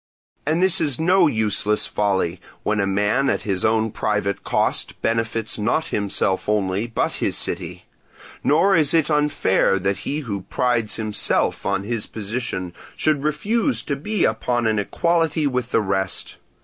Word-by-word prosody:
And 160 +4 +2
this 190 -3 +5
is 145 -6 +2
no 175 +2 +4
useless 105 -3 +1
folly, 95 -4 -1 0.2
when 105 0 0
a 100 - +1
man 105 +8 +1
at - - -1
his 95 -3 -1
own 110 0 +2
private 105 -2 -1
cost - - -1
benefits 115 -1 0
not 120 +9 0
himself 100 -1 0
only, 100 +1 0
but 115 - -1
his - - 0
city: - - -3 0.6
nor 190 +7 +4
is 155 -1 +4
it 160 -1 +2
unfair 150 -10 +2
that 95 +1 -1
he 145 +9 -3
who 100 -8 -4
prides 120 +1 0
himself 110 -2 0
on 100 0 0
his 110 0 -3
position 105 -4 -4 0.2
should 155 -3 +1
refuse 215 - 0
to 140 - -2
be 195 +8 -1
upon 120 +2 0
an 110 -1 +1
equality 165 - 0
with 125 -3 -1
the 115 - +2
rest. 95 -1 -2
115 Hz, 155 wpm, -22 LUFS, 100-150 Hz, 0.6 s, this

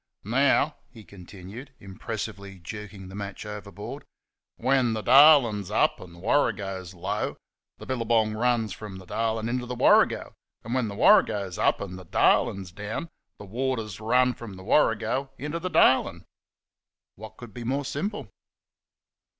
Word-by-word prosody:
" - - -60
Now," 140 +6 +2
he 115 -4 -14
continued, 100 +8 -12
impressively, 100 0 -7
jerking 100 +1 -9
the 95 - -11
match 100 +1 -6
over 105 -1 -8
board, 105 +3 -8 0.3
" - - -65
when 130 -3 +3
the 110 -1 -4
Darlin's 125 -7 +6
up, 105 - +2
and 85 -2 -12
the - - -14
Warrygo's 95 -6 -1
low, 95 +4 -3 0.4
the - - -11
billygong 115 -3 +1
runs 115 -3 0
from 100 -1 -9
the 95 - -12
Darlin' 110 +3 -2
into 125 +1 -2
the 125 - -4
Warrygo - - +3 0.3
and, 115 - -5
when 130 -3 0
the 100 - -6
Warrygo's 100 - +3
up - - +2
'n' 95 -2 -6
the 95 - -11
Darlin's 95 +2 +2
down, 105 - -6 0.3
the - - -10
waters 115 -2 -3
runs 125 +3 +2
from 110 -5 -9
the 95 - -11
Warrygo 115 +3 +1
'n' 140 - -7
inter 155 +3 -3
the 185 +2 -3
Darlin'." 130 - +3 0.9
What 110 +2 -12
could 120 -4 -11
be 120 - -7
more 135 +4 -1
simple 165 - -4
110 Hz, 160 wpm, -26 LUFS, 100-125 Hz, 0.9 s, Darlin's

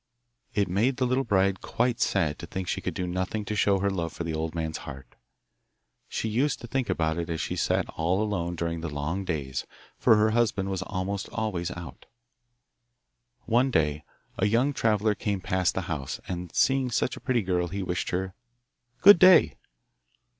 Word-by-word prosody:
It 100 -1 +2
made 110 +9 +1
the 130 - +1
little 130 +2 +1
bride 95 -4 +1
quite 120 0 -1
sad 75 -2 +1
to 85 - -7
think 95 +2 -5
she - - -2
could - - -4
do 90 - -2
nothing 95 +4 -2
to 105 - -3
show 100 -1 +3
her 100 +1 +1
love 85 -4 -2
for 85 - -5
the 80 -1 -3
old 80 +1 -3
man's 80 -1 -3
heart. 65 -4 -10 1.0
She - - -2
used 125 +6 0
to - - -7
think 130 +1 -2
about 80 0 0
it 85 0 -4
as 80 -1 -2
she - - -2
sat - - 0
all 85 +4 0
alone 90 -5 -2
during 85 0 -3
the 80 - -3
long 75 +7 -3
days, 70 -8 -3 0.3
for 110 - +5
her 110 +1 +3
husband 105 -4 +1
was 95 -1 -2
almost 95 +1 -3
always 95 -6 -2
out. 85 -6 -9 1.4
One 120 +4 +3
day 75 - +1 0.4
a - - +3
young 120 +7 +2
traveller 110 -3 +2
came 100 -1 -2
past 95 0 0
the 95 - 0
house, 75 -6 -4
and 90 -1 -4
seeing 135 -1 +3
such 120 +1 0
a - - -9
pretty 125 -4 +1
girl 90 -1 0
he 95 +3 -4
wished 90 -2 -2
her 95 +1 -2 0.7
'Good 200 -2 +9
day. 185 -1 +7
95 Hz, 190 wpm, -27 LUFS, 85-110 Hz, 1.4 s, Good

